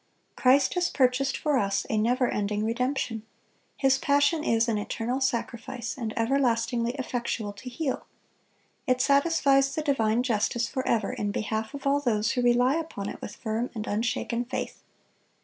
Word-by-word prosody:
(254) - - -12 0.2
"Christ... - - 0
has 355 -1 +1
purchased 265 0 +1
for 300 -3 +1
us 200 -2 0
a - - -1
never 245 +4 +2
ending 210 0 -1
redemption... 240 -1 -1 0.6
His 270 -1 +3
passion 285 +3 +2
is... 230 -4 +2
an 220 -3 0
eternal 235 +5 -3
sacrifice, 240 -1 -2
and 230 -4 -4
everlastingly 235 -1 +1
effectual 240 -5 -3
to 230 +5 -9
heal; 265 +2 -3 0.8
it 255 -1 +2
satisfies 280 -1 +3
the 310 - -1
divine 240 -5 +1
justice 235 0 0
forever 230 -4 -1
in 205 - -2
behalf 220 +4 -3
of 280 - -8
all 280 +1 +3
those 225 -5 +1
who 250 - 0
rely 245 +4 +3
upon 260 -12 -4
it - - -8
with 205 - -7
firm 225 +2 -2
and 215 -1 -4
unshaken 230 +2 -1
faith." 245 - -5
245 Hz, 160 wpm, -27 LUFS, 225-270 Hz, 0.8 s, His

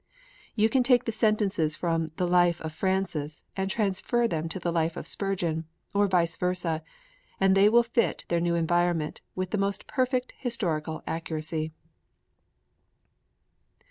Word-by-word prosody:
You 220 -1 +4
can 260 +3 +2
take 250 -1 +4
the 230 - 0
sentences 210 -8 +1
from 165 -2 -1
the 180 - 0
Life 175 -1 +3
of 160 -1 -5
Francis 170 -4 -2
and 190 0 -1
transfer 220 +4 +1
them 165 -4 -2
to 165 - -4
the 170 -1 -1
Life 165 0 0
of - - -5
Spurgeon, 175 -5 -2 0.3
or 205 0 +3
vice 175 -3 +2
versa, 180 -3 -1 0.6
and 195 0 +4
they 200 +2 +6
will 235 +2 +5
fit 235 0 0
their 170 - +1
new 170 0 +1
environment 170 -1 +1
with 185 0 -3
the 210 - 0
most 200 0 -1
perfect 255 -1 0
historical 165 - -2
accuracy. 160 -1 -3
180 Hz, 145 wpm, -27 LUFS, 165-205 Hz, 0.6 s, they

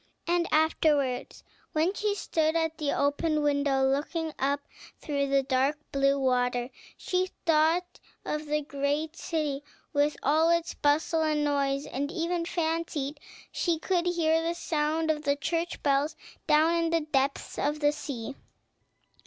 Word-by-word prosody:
and 345 0 +1
afterwards, 300 -4 +1 0.3
when 320 +5 +2
she 415 0 -1
stood 315 -5 0
at 320 -1 0
the 295 -2 0
open 300 +2 +1
window 285 -2 +2
looking 305 +4 -1
up 280 +1 +1 0.4
through 280 -2 -1
the 275 0 +2
dark 265 +2 +1
blue 275 0 +2
water, 250 -1 +1 0.3
she 370 0 -1 0.2
thought 330 +2 +2 0.3
of 300 0 -3
the 300 0 0
great 290 +3 -2
city, 300 -5 -2 0.3
with 290 0 +2
all 315 +4 +4
its 335 0 +1
bustle 310 +3 +1
and 305 -1 +1
noise, 280 -1 0
and 285 +3 -3
even 340 0 -1
fancied 320 -4 -2 0.3
she 340 -2 0
could 350 +2 0
hear 325 -2 +2
the 335 +1 -1
sound 315 0 0
of 300 -1 -2
the 285 -1 +1
church 330 +4 -2
bells, 285 +2 +2 0.3
down 315 +2 +4
in 335 -1 +1
the 330 0 +2
depths 280 -2 -1
of 295 +1 0
the 290 -1 +3
sea. 275 -4 -5
300 Hz, 145 wpm, -28 LUFS, 280-325 Hz, 0.4 s, all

